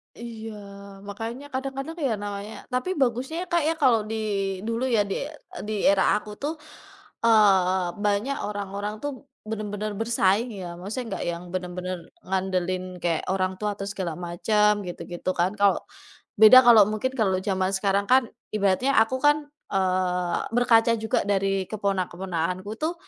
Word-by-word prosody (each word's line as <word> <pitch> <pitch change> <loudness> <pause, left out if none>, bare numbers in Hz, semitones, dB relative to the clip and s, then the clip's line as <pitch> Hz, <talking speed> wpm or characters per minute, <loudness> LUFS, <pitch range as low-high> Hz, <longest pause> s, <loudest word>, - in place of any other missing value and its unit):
Iya. 225 -2 -8 0.5
Makanya 225 +7 -6
kadang-kadang 275 +4 -4
ya, 265 -7 0
namanya 205 +1 -5 0.2
tapi 255 +10 -1
bagusnya, 265 +3 0
ya, 365 - -6
Kak, 340 -2 +2
ya, 325 - +2
kalo 250 -4 +6
di 225 - -2 0.5
dulu 230 +3 -1
ya, 230 -5 +3
di - - 0 0.5
di 215 - -3 0.2
era 195 -1 +3
aku 210 0 -3
tuh, 300 +3 -1 0.7
eee, 190 -5 +4 0.2
banyak 210 +7 +1
orang-orang 205 0 -4
tuh 290 - -1 0.4
bener-bener 215 -1 -3
bersaing 225 0 +2
ya, 180 - -6
maksudnya 215 +7 -5
nggak - - -4
yang 170 +1 -6
bener-bener 180 0 -4 0.3
ngandelin 185 -1 -1 0.2
kayak 170 -2 0
orang 185 -1 0
tua 210 - 0
atau 195 - -6
segala 185 -5 -3
macem 180 +5 +1 0.2
gitu-gitu 175 0 -5
kan. 180 - +3
Kalau 200 -1 +4 0.6
beda 220 +4 +10
kalau 230 -3 +9
mungkin 235 +5 -1
kalau 195 -4 +2
jaman 190 -1 0
sekarang 200 +1 +1
kan 260 +1 +6 0.3
ibaratnya 210 +6 +2
aku 225 +4 -1
kan, 295 +1 +5 0.4
eee, 185 -2 +1 0.2
berkaca 230 -1 +4
juga 220 0 0
dari 195 -1 +1
keponak 200 -4 -1
keponakanku 180 +1 -3
tuh, 325 +3 0
205 Hz, 150 wpm, -25 LUFS, 185-235 Hz, 0.7 s, beda